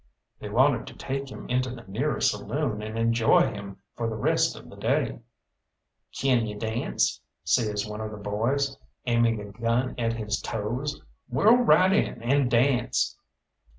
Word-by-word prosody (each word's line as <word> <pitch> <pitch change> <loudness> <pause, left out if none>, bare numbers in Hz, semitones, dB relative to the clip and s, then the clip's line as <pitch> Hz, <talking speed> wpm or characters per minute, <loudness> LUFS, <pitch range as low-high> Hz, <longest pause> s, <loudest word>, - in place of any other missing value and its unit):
They - - -6
wanted - - +3
to - - -10
take 135 0 -4
him - - -9
into 125 +1 0
the 120 -2 -9
nearest 125 +10 +1
saloon 135 -8 -2
and 110 +1 -5
enjoy 115 0 +3
him 100 -1 -8 0.2
for 115 -1 -2
the 110 - -4
rest 110 - +1
of - - -12
the - - -12
day. - - 0 0.9
"Kin 125 -4 +1
you 105 -1 -6
dance?" 110 +2 -1 0.2
says 105 +3 +1
one 105 +1 -6
of 110 - -4
the 105 - -8
boys, 115 +7 -1 0.3
aiming 115 -2 +2
a 100 -1 -8
gun 115 +4 0
at 115 -1 +1
his 105 -2 -2
toes. 120 +7 -3 0.3
"Whirl 210 - +5
right 190 -6 +5
in - - +1
and 135 +1 +2
dance!" 125 0 +2
115 Hz, 160 wpm, -26 LUFS, 105-130 Hz, 0.9 s, Whirl